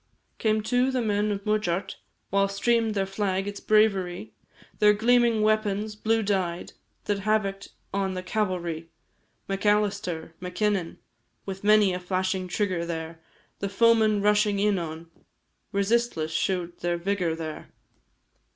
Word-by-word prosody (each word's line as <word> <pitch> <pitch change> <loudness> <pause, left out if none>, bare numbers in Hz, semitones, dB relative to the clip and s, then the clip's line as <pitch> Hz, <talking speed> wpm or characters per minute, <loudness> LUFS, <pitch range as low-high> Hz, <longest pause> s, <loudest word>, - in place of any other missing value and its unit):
Came 215 -1 +1
too 250 +3 +2
the 260 -1 0
men 210 -2 0
of 200 -1 -3
Muideart, 200 -3 -1 0.3
While 195 0 +3
stream'd 225 +2 +1
their 195 -1 +1
flag 195 0 -1
its 205 0 -5
bravery; 200 -3 +1 0.5
Their 210 -1 +6
gleaming 235 0 +3
weapons, 215 -1 0
blue 225 +1 +1
dyed, 185 -4 -2 0.3
That 205 -1 -1
havock'd 200 -1 0 0.3
on 195 -1 -1
the 185 - -4
cavalry. 180 -5 -2 0.6
Macalister, 195 -4 0
Mackinnon, 180 0 -1 0.5
With 195 0 -6
many 210 -2 +5
a 180 - -2
flashing 185 0 -1
trigger 185 -2 -1
there, 165 -1 -5 0.4
The 200 - -2
foemen 220 -1 +3
rushing 210 0 +3
in 200 -1 +2
on, 165 0 -7 0.6
Resistless 200 -5 0
shew'd 175 -2 -1
their 175 0 -1
vigour 180 -2 -1
there. 160 -1 -7
200 Hz, 130 wpm, -26 LUFS, 180-215 Hz, 0.6 s, Their